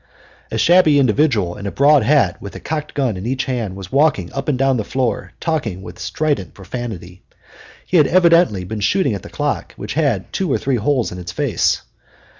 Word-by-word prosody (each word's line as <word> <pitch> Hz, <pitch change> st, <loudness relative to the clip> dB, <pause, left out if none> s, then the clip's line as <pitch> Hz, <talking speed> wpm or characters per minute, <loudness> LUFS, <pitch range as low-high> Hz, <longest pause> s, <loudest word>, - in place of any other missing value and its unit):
A -, -, -3 dB
shabby 170 Hz, -4 st, +5 dB
individual 120 Hz, -, +2 dB
in 100 Hz, -, -6 dB
a -, -, -3 dB
broad 145 Hz, +1 st, +5 dB
hat 115 Hz, -6 st, +2 dB
with 100 Hz, -, -8 dB
a -, -, -6 dB
cocked 150 Hz, -1 st, -5 dB
gun 130 Hz, -8 st, 0 dB
in 95 Hz, +5 st, -5 dB
each 130 Hz, +1 st, -1 dB
hand 115 Hz, -7 st, -3 dB
was 95 Hz, -2 st, -9 dB
walking 135 Hz, -, +2 dB
up 135 Hz, +2 st, -3 dB
and 140 Hz, -, +1 dB
down 135 Hz, 0 st, +2 dB
the 110 Hz, -, -1 dB
floor 125 Hz, +2 st, -2 dB
talking 115 Hz, -, -2 dB
with -, -, -10 dB
strident 145 Hz, -, -2 dB
profanity. 95 Hz, -4 st, -7 dB, 0.6 s
He 180 Hz, -, +1 dB
had 150 Hz, -, +5 dB
evidently 170 Hz, -, +4 dB
been 105 Hz, +4 st, -5 dB
shooting 135 Hz, -, +1 dB
at 100 Hz, -, -4 dB
the -, -, -11 dB
clock, -, -, -3 dB
which -, -, -6 dB
had 135 Hz, -, -1 dB
two 185 Hz, -6 st, -1 dB
or -, -, +2 dB
three 135 Hz, -2 st, -1 dB
holes 125 Hz, +2 st, 0 dB
in 90 Hz, -, -7 dB
its 90 Hz, 0 st, -6 dB
face. -, -, 0 dB
130 Hz, 205 wpm, -19 LUFS, 100-150 Hz, 0.6 s, shabby